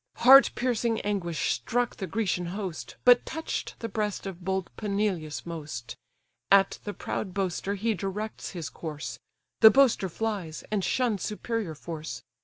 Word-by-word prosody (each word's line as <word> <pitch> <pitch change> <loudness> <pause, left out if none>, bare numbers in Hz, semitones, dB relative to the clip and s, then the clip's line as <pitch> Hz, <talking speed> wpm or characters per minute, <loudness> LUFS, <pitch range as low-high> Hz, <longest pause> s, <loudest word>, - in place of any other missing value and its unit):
Heart 270 +3 +8
piercing 235 -2 0
anguish 185 -6 -1
struck 245 0 -1
the 190 - -4
Grecian 180 -2 -1
host, 185 -2 -5
But 245 -1 +7
touch'd 320 0 -4
the 230 - -4
breast 210 -3 -2
of 185 -2 -7
bold 190 0 -2
Peneleus 200 -7 -2
most; 150 -8 -6 0.5
At 195 0 +5
the 205 - -3
proud 190 -4 -4
boaster 195 +1 -1
he 220 +3 0
directs 200 +3 -4
his 170 -4 -6
course; 145 -7 -6 0.4
The 220 - +10
boaster 250 -7 +4
flies, 195 -5 -3
and 205 -3 0
shuns 230 -5 +1
superior 210 -5 -3
force. 160 0 -6
200 Hz, 145 wpm, -28 LUFS, 170-225 Hz, 0.5 s, The